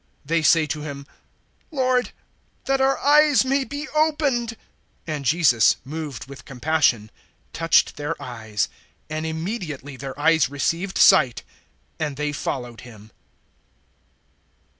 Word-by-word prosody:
(33)They 165 +1 +1
say 160 +1 +5
to 150 0 -4
him: 140 -2 -7 0.6
Lord, 255 -4 +1 0.6
that 270 0 +1
our 270 +1 +3
eyes 295 -2 +4
may 270 +1 +1
be 285 +3 -6
opened. 290 -7 0 0.5
(34)And 155 -2 -3
Jesus, 135 -6 +4
moved 150 -2 -6
with 140 0 -12
compassion, 130 -5 0 0.4
touched 165 0 +2
their 150 +2 -4
eyes; 110 -4 -3 0.4
and 155 +1 -3
immediately 160 - -5
their 135 +1 -7
eyes 160 -2 +3
received 165 +7 -2
sight; 130 -11 +5 0.6
and 150 -3 -2
they 150 0 -1
followed 125 -5 -5
him. 110 -3 -14
155 Hz, 120 wpm, -23 LUFS, -, 0.6 s, say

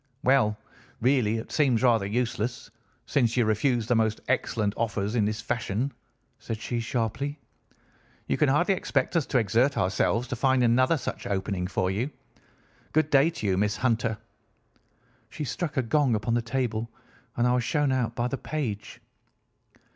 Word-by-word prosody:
"'Well, 125 -5 +3 0.4
really, 120 -3 +2
it 110 - -7
seems 130 -6 +2
rather 115 -5 +3
useless, 120 +1 -2 0.3
since 120 -4 +1
you 120 - +4
refuse 115 +2 +1
the 125 - +1
most 110 -2 +1
excellent 110 -5 0
offers 105 -2 -1
in 110 -4 +2
this 105 +1 -2
fashion,' 115 +4 -2 0.5
said 115 - -4
she 120 +1 -3
sharply. 120 +5 -2 0.9
'You - - 0
can 150 - +2
hardly 175 +8 +3
expect 185 - -1
us 165 -5 +1
to - - +1
exert 120 +5 +2
ourselves 105 +5 +1
to - - -2
find 130 +1 +2
another 130 +6 +3
such - - -5
opening 95 -2 -2
for 95 0 0
you. 115 +8 -1 0.8
Good 155 0 +2
day 140 +3 +5
to 170 -10 -6
you, 95 -2 +1
Miss 105 +1 +1
Hunter.' 115 -3 0 1.1
She - - -6
struck 150 +2 -3
a 130 - +3
gong 135 -1 +2
upon 105 +2 -1
the 120 - +2
table, 115 -1 -2 0.5
and 120 - +2
I 125 - +3
was 125 -1 +1
shown 145 +1 +1
out 120 -3 0
by 120 0 0
the 135 +1 -4
page. 120 -10 -4
120 Hz, 165 wpm, -27 LUFS, 110-130 Hz, 1.1 s, day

